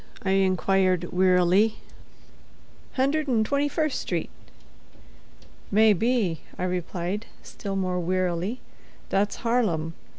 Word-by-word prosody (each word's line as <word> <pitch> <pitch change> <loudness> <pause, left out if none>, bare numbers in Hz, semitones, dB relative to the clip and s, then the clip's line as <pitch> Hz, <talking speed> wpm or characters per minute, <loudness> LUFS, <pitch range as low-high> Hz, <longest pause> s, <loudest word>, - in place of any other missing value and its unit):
I 190 - 0
inquired, 190 -2 +2
wearily. 185 +3 +4 1.2
"Hundred 280 +3 +1
'n' 225 -4 +3
twenty 280 +5 +1
first 310 -2 -1
street." - - -3 1.4
"May 215 +1 +5
be," 210 - 0 0.2
I - - -3
replied, 180 +2 -3 0.2
still 200 -2 -6
more 185 -2 -1
wearily. 185 +5 -1 0.5
"That's 200 +1 +1
Harlem. 185 -10 +1
195 Hz, 100 wpm, -25 LUFS, 180-225 Hz, 1.4 s, May